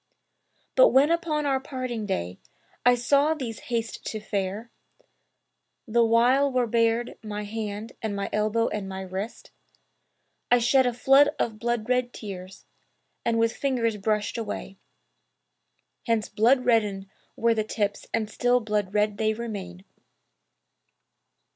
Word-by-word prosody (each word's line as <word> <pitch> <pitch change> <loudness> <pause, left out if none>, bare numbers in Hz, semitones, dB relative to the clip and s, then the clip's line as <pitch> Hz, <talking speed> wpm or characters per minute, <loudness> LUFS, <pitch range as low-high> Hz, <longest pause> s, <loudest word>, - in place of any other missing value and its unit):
But - - +7
when 285 - +4
upon 325 -3 0
our 270 -2 +1
parting 255 -5 -4
day 90 - -3 0.4
I 245 0 +6
saw 280 +6 +2
thee 260 -7 -4
haste 230 +1 -4
to 220 - -4
fare, 205 +2 -3 1.2
The 235 +1 +3
while 245 +5 +4
were 255 -1 +2
bared 230 +1 0
my 210 -1 -5
hand 210 +1 -5
and 220 -2 -2
my 200 0 -2
elbow 215 +2 +1
and 200 -2 -4
my 190 0 -5
wrist; 190 +4 -6 1.0
'I 245 - +6
shed 250 +2 +3
a 245 - 0
flood 270 +4 +5
of 220 -2 -2
blood 235 -1 -1
red 250 -1 0
tears 190 -2 -9 0.6
and 230 -1 +1
with 230 0 +1
fingers 235 -6 0
brushed 210 +2 -1
away; 205 -3 -6 1.3
Hence 225 -2 +1
blood 250 +4 +3
reddened 210 -5 +1 0.3
were 230 0 +2
the 220 -1 0
tips 205 -1 -2
and 225 -2 0
still 245 +3 +2
blood 210 -3 -2
red 210 -1 +1
they 220 0 +1
remain.' 195 -5 -6
225 Hz, 135 wpm, -26 LUFS, 210-245 Hz, 1.3 s, But